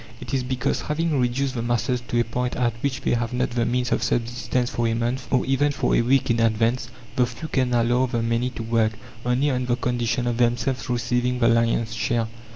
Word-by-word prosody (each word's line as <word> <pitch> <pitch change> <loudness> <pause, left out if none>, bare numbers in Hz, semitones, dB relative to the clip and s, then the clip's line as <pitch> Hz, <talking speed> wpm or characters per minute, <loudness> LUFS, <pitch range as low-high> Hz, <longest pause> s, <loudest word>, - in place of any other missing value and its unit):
It - - -8
is 135 - +2
because, 125 0 -1
having 150 -1 0
reduced 130 +2 0
the 120 - -2
masses 120 +1 0
to 120 - 0
a - - +4
point 125 +2 -2
at 120 -2 +1
which 135 -3 -1
they - - +1
have 120 0 -1
not 125 +1 0
the 120 -1 0
means 125 +1 0
of - - +1
subsistence 120 +1 -1
for 120 -1 0
a 115 - 0
month, 120 +3 -2
or 125 - +2
even 140 +2 +2
for 140 - +1
a - - +4
week 130 +1 +2
in 115 - +1
advance, 115 +2 +1 0.3
the 125 -1 +3
few 125 +6 -7
can 130 -4 0
allow 120 +2 +2
the 120 -2 -1
many 115 +2 0
to 120 -2 -6
work, 115 -1 +1 0.3
only 130 +4 +2
on 125 -1 -1
the 120 - +2
condition 120 0 -1
of 120 -1 -1
themselves 120 +2 0
receiving 125 +1 0
the 115 -2 +3
lion's 115 -1 +2
share. 115 0 0
120 Hz, 225 wpm, -24 LUFS, 115-125 Hz, 0.3 s, a